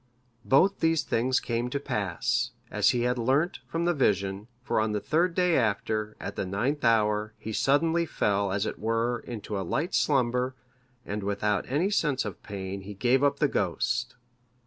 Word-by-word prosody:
Both 185 +9 +4
these 165 -1 +2
things 130 +3 +1
came 120 +1 -2
to 140 - -2
pass, 120 +2 -1 0.2
as 105 -1 +3
he 120 - +1
had 125 +1 0
learnt 140 +9 +1
from 165 +1 -2
the 175 - +3
vision; 100 - 0 0.2
for 130 - 0
on 110 0 0
the 105 - 0
third 170 - +1
day 180 -2 +3
after, 110 -2 0
at - - -6
the - - -2
ninth 120 +10 -1
hour, 105 -2 +2
he 110 - -6
suddenly 165 +7 +2
fell, 100 -6 0
as 100 +2 0
it - - -4
were, 115 +2 0
into 105 -3 -4
a - - -2
light 140 - -2
slumber, 125 -2 +1 0.5
and 105 +1 -3
without 100 +2 -1
any 160 +10 +1
sense 150 - +1
of 105 -4 -6
pain 95 -1 -6
he 100 +1 -9
gave 125 +7 +2
up 140 0 +3
the 150 - +3
ghost. 125 +5 -1
120 Hz, 180 wpm, -27 LUFS, 105-140 Hz, 0.5 s, Both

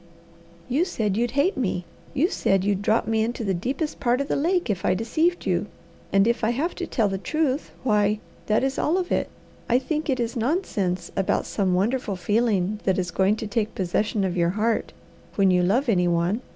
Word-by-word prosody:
"You 270 +7 +2
said 215 - -1
you'd 240 +2 +1
hate 325 +8 +3
me. 185 -8 -1 0.3
You 290 +5 +3
said 195 -1 +1
you'd 200 -1 0
drop 215 +3 +2
me 220 -1 +1
into 235 +1 -3
the 195 -3 0
deepest 265 - -3
part 245 0 +2
of 280 - -2
the - - +1
lake 350 +5 +1
if 200 -5 -2
I 185 - +2
deceived 315 - 0
you; - - 0 0.4
and 195 0 +4
if 235 0 0
I 220 - +3
have 285 +9 -1
to 355 - -3
tell 225 -5 +1
the 195 -1 -2
truth, 295 +3 -1
why, 210 -3 +2 0.3
that 215 +3 +2
is 270 0 -1
all 330 +5 +2
of 365 -1 -2
it. - - 0 0.4
I 245 - +5
think 305 +4 -2
it 260 -2 +1
is 235 +1 -2
nonsense 215 - -1
about 195 - 0
some 190 -3 0
wonderful 210 +2 0
feeling 210 0 +1
that 190 - +1
is 180 -1 -1
going 195 +2 +2
to 220 0 -5
take 215 0 -2
possession 200 +3 0
of 185 -1 -1
your 170 -1 +2
heart 220 +4 0 0.4
when 195 -2 +4
you 180 0 +3
love 225 +10 +2
any 180 -6 +3
one. 175 +6 +1
220 Hz, 210 wpm, -24 LUFS, 195-265 Hz, 0.4 s, I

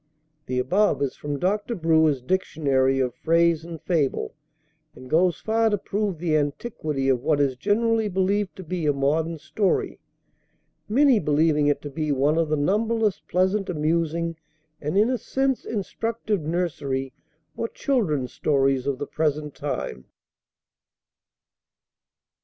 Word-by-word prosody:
The 125 - -2
above 200 +11 +2
is 135 - -2
from 145 -1 -4
Dr. 205 - -1
Brewer's 160 - +2
"Dictionary 135 -5 +1
of 125 -2 0
Phrase 165 +4 +2
and 165 -1 -8
Fable," 155 -7 -1 0.6
and 130 +1 -12
goes 170 +3 +2
far 225 0 +2
to 205 - +1
prove 200 -1 -2
the 160 -1 0
antiquity 150 - -2
of 130 -3 +2
what 150 +1 +1
is 140 -2 +2
generally 225 - +1
believed 195 +1 0
to 190 - -8
be 170 -2 -3
a 145 - +3
modern 155 +4 0
story, 195 +5 -1 0.9
many 260 +1 +5
believing 150 -1 +2
it 145 - +1
to 145 - -5
be 155 +1 -2
one 145 +4 +2
of 165 -2 +1
the 155 - +1
numberless 210 +5 +1
pleasant, 190 +2 +1
amusing, 165 0 -1 0.4
and 150 +6 -1
in 220 +5 +4
a 255 - -1
sense 265 +3 -1
instructive 220 -1 -2
nursery 145 -5 -2 0.4
or 230 - -2
children's 160 - -1
stories 135 -2 +1
of 140 -2 0
the 145 - -4
present 150 -1 -1
time. 130 - -4
160 Hz, 140 wpm, -24 LUFS, 145-200 Hz, 0.9 s, many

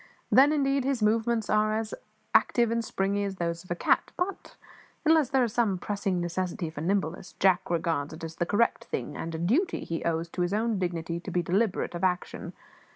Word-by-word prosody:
Then, 275 +3 +7
indeed, 275 -2 +1
his 265 -4 0
movements 225 +1 +2
are 215 0 +2
as 220 -1 -3 0.4
active 235 -2 +4
and 230 0 0
springy 200 -1 -1
as 200 -1 -3
those 170 -2 -3
of 180 - -19
a 175 - 0
cat; - - +2
but, 365 +1 -3 0.5
unless 315 -4 +4
there 265 -1 +3
is 230 -3 -1
some 220 -6 +2
pressing 195 -1 -2
necessity 175 0 -2
for 150 - -7
nimbleness, 180 0 -1
Jack 185 -2 +2
regards 165 -4 0
it 160 +1 -10
as 165 0 -6
the 175 - 0
correct 230 +3 +1
thing 135 +3 -4
and 165 0 -4
a - - -2
duty 240 - +1
he 165 - -4
owes 165 0 0
to 180 - -4
his 175 +3 +1
own 220 -1 0
dignity 170 -2 -2
to 180 - -8
be 175 -1 0
deliberate 190 +4 0
of 175 +1 -5
action. 180 -1 -1
195 Hz, 205 wpm, -28 LUFS, 170-230 Hz, 0.5 s, Then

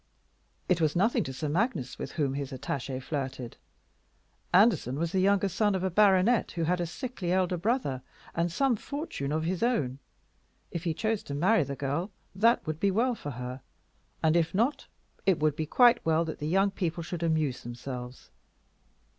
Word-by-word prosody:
It 180 -2 +2
was 155 -2 +2
nothing 205 +7 +2
to 135 - -4
Sir 150 +4 -4
Magnus 175 - -1
with - - -5
whom 145 -5 0
his 140 -1 -4
attaché 135 0 -4
flirted. 130 -3 -4 1.0
Anderson 185 - +4
was 165 +1 -1
the 190 - +1
younger 200 +1 +3
son 205 +2 +1
of 185 - -2
a 190 - 0
baronet 205 +4 +4
who 165 - -1
had 175 +2 +1
a 175 - -1
sickly 215 - -4
elder 185 -1 +2
brother, 175 - -1 0.3
and 170 +1 0
some 270 +6 +2
fortune 275 - -5
of 155 +1 0
his 175 +2 -2
own. 145 - 0 0.7
If 170 0 -5
he 165 -2 0
chose 220 +2 0
to 140 - -5
marry 180 +6 +3
the 140 0 -5
girl, 145 +8 -2 0.2
that 230 +5 +3
would 155 0 -3
be 200 - +2
well 235 +6 +2
for 145 - -6
her; 125 0 -6 0.6
and 160 0 +4
if 170 +1 +1
not, 240 +8 +1 0.4
it 190 -4 +5
would 150 -1 +1
be 155 0 -3
quite 245 - +5
well 165 +1 +2
that 160 - -6
the 150 - -3
young 195 +4 +3
people 175 -3 -2
should 170 +1 -5
amuse 155 -6 0
themselves. 125 +1 -7
170 Hz, 185 wpm, -29 LUFS, 145-200 Hz, 1.0 s, it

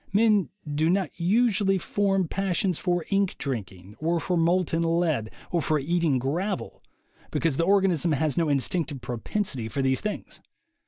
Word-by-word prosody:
Men 210 -2 +3 0.2
do 150 +2 +1
not 185 -3 +1
usually 195 +1 +3
form 195 -1 0
passions 185 -1 -1
for 175 -3 0
ink 195 -1 +1
drinking, 100 -7 -5
or 165 +2 +1
for 180 +3 -1
molten 170 0 +2
lead, 165 -9 +1 0.2
or 170 - +1
for 155 0 +1
eating 160 -1 +1
gravel, 170 +11 -3 0.5
because 165 -5 0
the 165 - +2
organism 185 -4 +3
has 150 0 0
no 165 -3 +1
instinctive 145 0 -1
propensity 120 - -3
for 135 +4 -2
these 130 0 +1
things. 210 0 -5
170 Hz, 150 wpm, -26 LUFS, 145-190 Hz, 0.5 s, Men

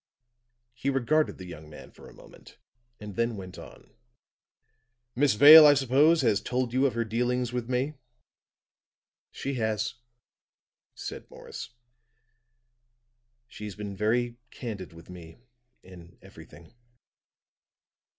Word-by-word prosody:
He 130 +3 -3
regarded 140 +4 0
the 95 - -10
young 80 -3 -11
man 75 - -13
for - - -15
a - - -16
moment, - - -17 0.4
and 105 -2 -9
then 115 0 -1
went 95 -2 -10
on. - - -15 1.2
"Miss 135 -2 +2
Vale, 150 +6 +10
I 145 - +6
suppose, 140 +4 +3
has 110 -4 +2
told 125 -1 -3
you 130 +2 +3
of 125 - -5
her 115 0 -1
dealings 125 +2 -2
with 125 -1 -4
me." 130 +4 -1 1.4
"She 140 - -5
has," 110 -1 -2 1.0
said - - -8
Morris. - - -10 1.8
"She's 105 -4 -9
been 105 -1 -7
very 120 +4 -1
candid 105 -7 -8
with 85 +1 -15
me 85 -2 -12 0.5
in 90 -2 -15
everything. 85 - -16
115 Hz, 120 wpm, -27 LUFS, 100-130 Hz, 1.8 s, Vale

